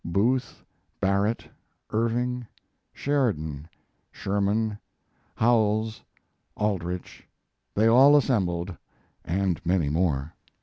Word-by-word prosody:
Booth, 115 Hz, +9 st, 0 dB, 0.4 s
Barrett, 100 Hz, +3 st, 0 dB, 0.4 s
Irving, 120 Hz, +2 st, -1 dB, 0.4 s
Sheridan, 80 Hz, -, -1 dB, 0.4 s
Sherman, 105 Hz, +2 st, -1 dB, 0.6 s
Howells, 110 Hz, -1 st, +2 dB, 0.6 s
Aldrich: 90 Hz, -4 st, -3 dB, 0.5 s
they 110 Hz, -, +3 dB
all 135 Hz, +6 st, +7 dB
assembled, 95 Hz, -9 st, 0 dB, 0.5 s
and 90 Hz, 0 st, -1 dB
many 85 Hz, -4 st, +1 dB
more. 75 Hz, -2 st, 0 dB
105 Hz, 75 wpm, -26 LUFS, 90-115 Hz, 0.6 s, all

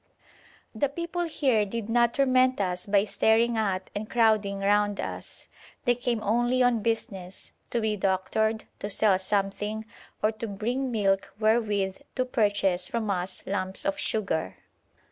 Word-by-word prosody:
The 255 Hz, +5 st, 0 dB
people 340 Hz, +4 st, -3 dB
here 265 Hz, -9 st, +2 dB
did 210 Hz, +1 st, -4 dB
not 235 Hz, 0 st, +2 dB
torment 255 Hz, -2 st, +3 dB
us 180 Hz, -1 st, -1 dB
by 200 Hz, 0 st, +3 dB
staring 225 Hz, +2 st, +2 dB
at 195 Hz, -4 st, -1 dB
and 210 Hz, +1 st, -5 dB
crowding 215 Hz, -4 st, +2 dB
round 205 Hz, 0 st, +2 dB
us. -, -, -6 dB, 0.4 s
They 245 Hz, -, +5 dB
came 240 Hz, -2 st, -2 dB
only 240 Hz, +4 st, +2 dB
on 245 Hz, -2 st, +3 dB
business, 195 Hz, -5 st, -3 dB, 0.2 s
to 240 Hz, -, 0 dB
be 220 Hz, -1 st, 0 dB
doctored, 205 Hz, +3 st, 0 dB, 0.2 s
to 205 Hz, -, -4 dB
sell 200 Hz, -2 st, +3 dB
something, 205 Hz, +2 st, -1 dB, 0.4 s
or 215 Hz, -, +4 dB
to 225 Hz, +1 st, -6 dB
bring 240 Hz, +6 st, -2 dB
milk 195 Hz, -3 st, +1 dB
wherewith 210 Hz, -4 st, +1 dB, 0.2 s
to 255 Hz, -, +1 dB
purchase 205 Hz, -6 st, +1 dB
from 220 Hz, -3 st, -2 dB
us 185 Hz, 0 st, -3 dB
lumps 190 Hz, +5 st, -1 dB
of 295 Hz, 0 st, -1 dB
sugar. 160 Hz, -, -1 dB
215 Hz, 145 wpm, -27 LUFS, 195-235 Hz, 0.4 s, They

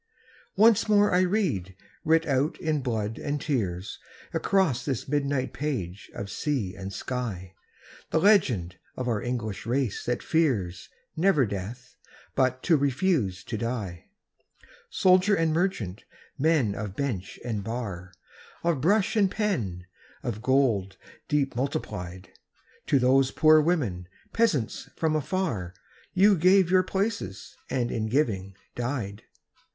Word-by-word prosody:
Once 220 Hz, +1 st, +5 dB
more 205 Hz, -1 st, +4 dB
I 180 Hz, -, +5 dB
read, 175 Hz, -, 0 dB, 0.3 s
writ 165 Hz, +1 st, +3 dB
out 140 Hz, +1 st, 0 dB
in 155 Hz, -3 st, 0 dB
blood 115 Hz, -3 st, -2 dB
and 145 Hz, 0 st, -2 dB
tears, 100 Hz, -, -2 dB, 0.3 s
Across 180 Hz, -11 st, +1 dB
this 135 Hz, -5 st, -3 dB
midnight 140 Hz, -2 st, -1 dB
page 105 Hz, -, -4 dB
of 100 Hz, 0 st, -5 dB
sea 130 Hz, -, -2 dB
and 95 Hz, 0 st, -6 dB
sky, 100 Hz, -4 st, -4 dB, 0.6 s
The -, -, +1 dB
legend 125 Hz, -, +3 dB, 0.2 s
of 125 Hz, -, -3 dB
our 110 Hz, -4 st, 0 dB
English 115 Hz, -4 st, -4 dB
race 125 Hz, -3 st, -1 dB
that 120 Hz, 0 st, -1 dB
fears, 115 Hz, -, 0 dB, 0.3 s
never 160 Hz, -5 st, +3 dB
death, 105 Hz, +5 st, -7 dB, 0.4 s
but 130 Hz, 0 st, +1 dB
to 165 Hz, -3 st, +4 dB
refuse 135 Hz, -, 0 dB
to 110 Hz, -, -4 dB
die! 110 Hz, -8 st, -4 dB, 0.8 s
Soldier 185 Hz, +2 st, +4 dB
and 165 Hz, -3 st, +1 dB
merchant, 140 Hz, -, -1 dB, 0.3 s
men 145 Hz, -8 st, +2 dB
of 100 Hz, -1 st, -5 dB
bench 110 Hz, -9 st, -3 dB
and 110 Hz, -4 st, -2 dB
bar. 100 Hz, -6 st, -5 dB, 0.5 s
Of 170 Hz, -6 st, +1 dB
brush 200 Hz, -, +2 dB
and 200 Hz, -3 st, +4 dB
pen, 115 Hz, -, -2 dB, 0.4 s
of 115 Hz, -5 st, -3 dB
gold 115 Hz, -8 st, +1 dB, 0.3 s
deep 140 Hz, -3 st, 0 dB
multiplied, 95 Hz, -9 st, -4 dB, 0.6 s
To 140 Hz, -, +4 dB
those 130 Hz, +1 st, +4 dB
poor 155 Hz, +1 st, +5 dB
women, 125 Hz, -, 0 dB, 0.3 s
peasants 165 Hz, -, 0 dB
from 160 Hz, -1 st, 0 dB
afar. 130 Hz, -, -2 dB, 0.4 s
You 200 Hz, +2 st, +6 dB
gave 185 Hz, +1 st, +4 dB
your 185 Hz, 0 st, +6 dB
places, 190 Hz, -, -3 dB
and 125 Hz, -2 st, -1 dB
in 110 Hz, -1 st, -1 dB
giving 105 Hz, -7 st, 0 dB, 0.2 s
died 120 Hz, -5 st, -3 dB
130 Hz, 130 wpm, -27 LUFS, 100-160 Hz, 0.8 s, You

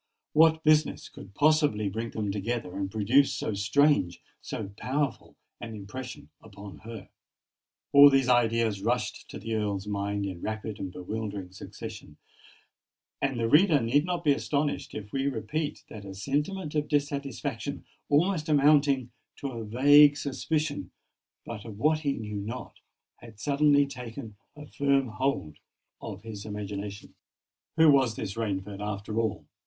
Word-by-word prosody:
What 160 Hz, +1 st, +5 dB
business 155 Hz, 0 st, +2 dB
could 100 Hz, +1 st, -13 dB
possibly 145 Hz, -9 st, +3 dB
bring 110 Hz, +4 st, -3 dB
them 105 Hz, -3 st, -3 dB
together, 105 Hz, 0 st, -3 dB
and 100 Hz, -1 st, -2 dB
produce 115 Hz, +7 st, +3 dB
so 110 Hz, -, -2 dB
strange—so 100 Hz, -, 0 dB
powerful 135 Hz, +3 st, -2 dB, 0.2 s
an 115 Hz, -2 st, -7 dB
impression 125 Hz, +7 st, -8 dB
upon 100 Hz, -2 st, -11 dB
her? 115 Hz, -3 st, -9 dB, 0.8 s
All 145 Hz, 0 st, +10 dB
these 135 Hz, -2 st, +3 dB
ideas 115 Hz, -4 st, +2 dB
rushed 120 Hz, +4 st, -2 dB
to -, -, -7 dB
the 115 Hz, +3 st, -5 dB
Earl's 105 Hz, -2 st, -1 dB
mind 100 Hz, 0 st, -2 dB
in 90 Hz, -3 st, -6 dB
rapid 110 Hz, -1 st, -4 dB
and 95 Hz, -2 st, -4 dB
bewildering 100 Hz, 0 st, -5 dB
succession; 95 Hz, -, -9 dB, 1.0 s
and 135 Hz, -3 st, 0 dB
the 115 Hz, -, +1 dB
reader 155 Hz, -, +5 dB
need 130 Hz, +5 st, +2 dB
not 175 Hz, 0 st, -2 dB
be 150 Hz, -, +4 dB
astonished 145 Hz, +1 st, -1 dB
if 105 Hz, -1 st, -7 dB
we 135 Hz, 0 st, -1 dB
repeat 150 Hz, +2 st, -3 dB
that 105 Hz, -, -9 dB
a 95 Hz, -1 st, -8 dB
sentiment 150 Hz, -, -2 dB
of 150 Hz, -1 st, 0 dB
dissatisfaction—almost 145 Hz, -, -1 dB
amounting 140 Hz, -3 st, +4 dB, 0.2 s
to 140 Hz, -, -5 dB
a 115 Hz, -2 st, -5 dB
vague 145 Hz, +6 st, +6 dB
suspicion, 145 Hz, +2 st, -2 dB, 0.6 s
but 110 Hz, -3 st, -7 dB
of 110 Hz, -3 st, -9 dB
what 155 Hz, +6 st, +2 dB
he 145 Hz, -3 st, 0 dB
knew 105 Hz, -3 st, -5 dB
not—had 115 Hz, 0 st, -11 dB
suddenly 145 Hz, +2 st, +3 dB
taken 115 Hz, -5 st, -8 dB, 0.2 s
a 150 Hz, 0 st, -10 dB
firm 140 Hz, -3 st, +1 dB
hold 120 Hz, -, -2 dB, 0.4 s
of 100 Hz, -2 st, -7 dB
his 110 Hz, -3 st, -7 dB
imagination. 105 Hz, -1 st, -6 dB, 0.6 s
Who 160 Hz, -2 st, +7 dB
was 130 Hz, -5 st, +3 dB
this 100 Hz, -3 st, -4 dB
Rainford, 100 Hz, -2 st, -3 dB
after 105 Hz, +1 st, -3 dB
all? 110 Hz, -3 st, -2 dB
115 Hz, 140 wpm, -28 LUFS, 105-145 Hz, 1.0 s, All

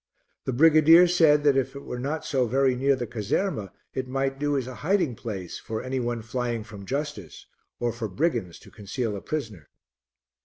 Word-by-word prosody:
The -, -, -1 dB
brigadier 160 Hz, +5 st, +7 dB
said 160 Hz, -4 st, +4 dB
that 145 Hz, -2 st, +4 dB
if 135 Hz, 0 st, 0 dB
it 140 Hz, -, -8 dB
were 125 Hz, -, -5 dB
not 145 Hz, +5 st, -3 dB
so 130 Hz, -3 st, +1 dB
very 130 Hz, +2 st, +2 dB
near 135 Hz, +2 st, +2 dB
the 125 Hz, -2 st, -3 dB
caserma, 110 Hz, -, -2 dB, 0.2 s
it 130 Hz, -1 st, -3 dB
might 135 Hz, +1 st, -2 dB
do 145 Hz, -1 st, +1 dB
as 130 Hz, -, -2 dB
a 130 Hz, -, -7 dB
hiding 175 Hz, -5 st, +1 dB
place 100 Hz, -6 st, -6 dB
for 110 Hz, 0 st, -5 dB
any 130 Hz, 0 st, -2 dB
one 120 Hz, -2 st, -2 dB
flying 120 Hz, -1 st, -2 dB
from 105 Hz, -2 st, -11 dB
justice, 135 Hz, -, -5 dB, 0.3 s
or 120 Hz, -1 st, 0 dB
for 120 Hz, -2 st, -4 dB
brigands 110 Hz, -, -1 dB
to -, -, -16 dB
conceal 105 Hz, +1 st, -4 dB
a 100 Hz, -, -6 dB
prisoner. 110 Hz, -, -5 dB
130 Hz, 190 wpm, -26 LUFS, 110-145 Hz, 0.3 s, brigadier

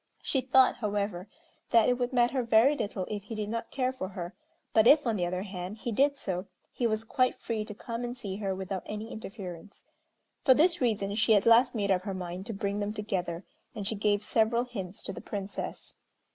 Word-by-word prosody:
She 265 Hz, -, +1 dB
thought, 260 Hz, 0 st, +4 dB
however, 205 Hz, -4 st, -2 dB, 0.4 s
that 230 Hz, -2 st, +5 dB
it 245 Hz, 0 st, +2 dB
would 245 Hz, +1 st, 0 dB
matter 245 Hz, +1 st, +2 dB
very 235 Hz, +4 st, +5 dB
little 205 Hz, -7 st, -3 dB
if 205 Hz, -1 st, -5 dB
he 225 Hz, -, -6 dB
did 210 Hz, -1 st, -3 dB
not 230 Hz, +1 st, -3 dB
care 255 Hz, -2 st, 0 dB
for 255 Hz, -7 st, -4 dB
her, 180 Hz, -1 st, -6 dB, 0.4 s
but 220 Hz, +1 st, +5 dB
if, 290 Hz, +1 st, +7 dB
on 230 Hz, -2 st, +1 dB
the 175 Hz, -3 st, 0 dB
other 180 Hz, +1 st, -2 dB
hand, 190 Hz, 0 st, -6 dB
he 235 Hz, -, -4 dB
did 280 Hz, +5 st, +3 dB
so, 185 Hz, -4 st, -3 dB, 0.3 s
he 240 Hz, -, +1 dB
was 215 Hz, 0 st, -1 dB
quite 255 Hz, +2 st, +1 dB
free 225 Hz, -2 st, -3 dB
to 210 Hz, -, -8 dB
come 230 Hz, +2 st, -5 dB
and 245 Hz, +1 st, -4 dB
see 200 Hz, -5 st, -5 dB
her 195 Hz, -2 st, -2 dB
without 190 Hz, 0 st, -4 dB
any 215 Hz, +2 st, -5 dB
interference. 195 Hz, -3 st, -8 dB, 0.6 s
For 260 Hz, -, +7 dB
this 340 Hz, +3 st, +3 dB
reason 205 Hz, -5 st, +1 dB
she 220 Hz, +1 st, +4 dB
at 200 Hz, -, +3 dB
last 235 Hz, +2 st, +6 dB
made 200 Hz, -2 st, +1 dB
up 185 Hz, -1 st, +3 dB
her 195 Hz, 0 st, -4 dB
mind 180 Hz, +1 st, -5 dB
to 225 Hz, -, -4 dB
bring 200 Hz, 0 st, -2 dB
them 205 Hz, 0 st, -2 dB
together, 185 Hz, -5 st, -3 dB, 0.3 s
and 205 Hz, -2 st, -4 dB
she 220 Hz, -, -1 dB
gave 205 Hz, 0 st, +1 dB
several 230 Hz, +2 st, +2 dB
hints 200 Hz, -7 st, -6 dB
to 195 Hz, -, -3 dB
the -, -, -8 dB
Princess. 200 Hz, -1 st, -5 dB
215 Hz, 215 wpm, -29 LUFS, 195-240 Hz, 0.6 s, if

